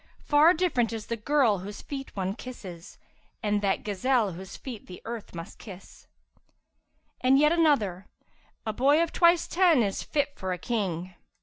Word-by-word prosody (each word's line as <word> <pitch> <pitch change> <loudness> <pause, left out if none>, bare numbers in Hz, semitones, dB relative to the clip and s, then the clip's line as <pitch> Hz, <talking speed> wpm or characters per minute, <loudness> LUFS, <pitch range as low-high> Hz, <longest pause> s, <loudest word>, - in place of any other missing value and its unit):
Far 305 +4 +5
different 300 -10 +1
is 220 -2 -5
the 230 - -3
girl 230 -3 +2
whose 200 +3 -8
feet 270 -2 -7
one 190 -1 -2
kisses 190 -8 -10 0.2
* - - -39
And 205 -1 +1
that 195 -1 0
gazelle 215 +1 +1
whose 185 +2 -9
feet 245 -6 -8
the 180 - -9
earth 230 -5 -7
must 165 0 -8
kiss.' 190 -3 -12 1.1
And 260 +2 +5
yet 300 +2 +5
another, 230 - +2 0.6
'A 220 - -2
boy 285 +8 +4
of 335 - -3
twice 340 -1 +4
ten 340 -8 +4
is 195 -2 -2
fit 290 -1 -1
for 185 -1 -3
a - - -4
King!' 185 -4 -3
225 Hz, 170 wpm, -27 LUFS, 195-285 Hz, 1.1 s, Far